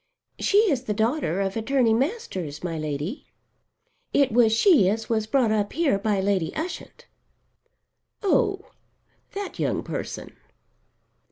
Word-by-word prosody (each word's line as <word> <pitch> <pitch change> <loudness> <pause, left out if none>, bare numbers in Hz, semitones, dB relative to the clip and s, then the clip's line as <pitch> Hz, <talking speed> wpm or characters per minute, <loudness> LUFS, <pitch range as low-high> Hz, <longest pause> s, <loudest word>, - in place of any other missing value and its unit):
"She 400 - +2
is 260 -2 -1
the 210 - -2
daughter 220 - 0
of 195 0 -2
Attorney 230 0 +2
Masters, 225 - -3
my 170 -2 -3
Lady. 155 - -4 0.9
It 280 -4 +3
was 230 -1 +4
she 230 - +5
as 220 +2 -3
was 220 -1 0
brought 240 -1 +2
up 205 -1 0
here 310 -12 +1
by 205 -1 0
Lady 190 -4 0
Ushant." 335 +2 -6 1.2
"Oh, 395 -1 +1 0.6
that 400 -1 -5
young - - -1
person." - - -6
225 Hz, 125 wpm, -25 LUFS, 195-290 Hz, 1.2 s, she